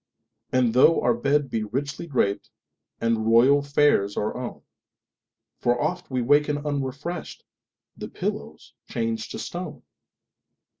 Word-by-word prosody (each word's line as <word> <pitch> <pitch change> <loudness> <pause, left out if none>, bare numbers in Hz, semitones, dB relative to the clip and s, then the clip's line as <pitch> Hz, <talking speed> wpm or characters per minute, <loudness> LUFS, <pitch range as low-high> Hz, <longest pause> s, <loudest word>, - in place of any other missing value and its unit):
And 125 -3 +2
tho 135 +6 +6
our 120 0 +2
bed 140 +3 0
be 110 -1 -1
richly 135 +9 -4
drapedAnd 115 -1 -2
royal 120 +6 +5
fares 140 -8 +2
our 105 - -1
own, 125 -1 -6 1.0
For 120 0 +1
oft - - -2
we 130 -2 -1
waken 145 +3 +3
unrefreshed—The 145 +4 -6
pillow's - - -5 0.2
changed 115 -1 -2
to - - -6
stone! 180 +1 -6
130 Hz, 110 wpm, -25 LUFS, 115-145 Hz, 1.0 s, tho